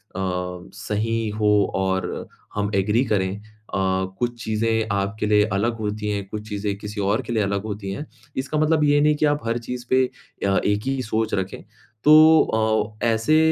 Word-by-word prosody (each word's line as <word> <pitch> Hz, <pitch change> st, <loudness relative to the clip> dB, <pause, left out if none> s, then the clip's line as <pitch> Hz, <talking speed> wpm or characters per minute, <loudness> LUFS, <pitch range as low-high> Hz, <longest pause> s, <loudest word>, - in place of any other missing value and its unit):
अ, 90 Hz, -1 st, -3 dB
सही 110 Hz, +2 st, -2 dB
हो 105 Hz, 0 st, +1 dB, 0.3 s
और 95 Hz, 0 st, -1 dB, 0.3 s
हम 105 Hz, 0 st, -1 dB
एग्री 105 Hz, +5 st, +2 dB
करें। 95 Hz, -5 st, 0 dB, 0.4 s
अ, -, -, 0 dB, 0.4 s
कुछ 120 Hz, -1 st, -2 dB
चीज़ें 110 Hz, 0 st, 0 dB
आपके 100 Hz, +2 st, -1 dB
लिए 105 Hz, 0 st, +4 dB
अलग 115 Hz, +4 st, 0 dB
होती 105 Hz, 0 st, -3 dB
हैं, 100 Hz, -1 st, -2 dB
कुछ 105 Hz, +1 st, -6 dB
चीज़ें 100 Hz, -1 st, -2 dB
किसी 105 Hz, +1 st, -5 dB
और 100 Hz, +2 st, +1 dB
के 120 Hz, -, -5 dB
लिए 110 Hz, -2 st, +2 dB
अलग 100 Hz, 0 st, -1 dB
होती 105 Hz, -2 st, -5 dB
हैं। 145 Hz, +10 st, -5 dB, 0.3 s
इसका 135 Hz, +3 st, -2 dB
मतलब 155 Hz, 0 st, +3 dB
ये 145 Hz, 0 st, +4 dB
नहीं 150 Hz, 0 st, +4 dB
कि 150 Hz, -, +1 dB
आप 145 Hz, 0 st, +2 dB
हर 115 Hz, +1 st, 0 dB
चीज़ 125 Hz, 0 st, -5 dB
पे 130 Hz, 0 st, +4 dB, 0.4 s
अ, 95 Hz, -1 st, +2 dB
एक 105 Hz, 0 st, +1 dB
ही 135 Hz, -1 st, 0 dB
सोच 110 Hz, 0 st, -1 dB
रखें। 95 Hz, -1 st, -3 dB, 0.4 s
तो 155 Hz, +1 st, +8 dB, 0.6 s
अ, -, -, +3 dB
ऐसे 115 Hz, +7 st, +3 dB
105 Hz, 180 wpm, -23 LUFS, 100-120 Hz, 0.6 s, तो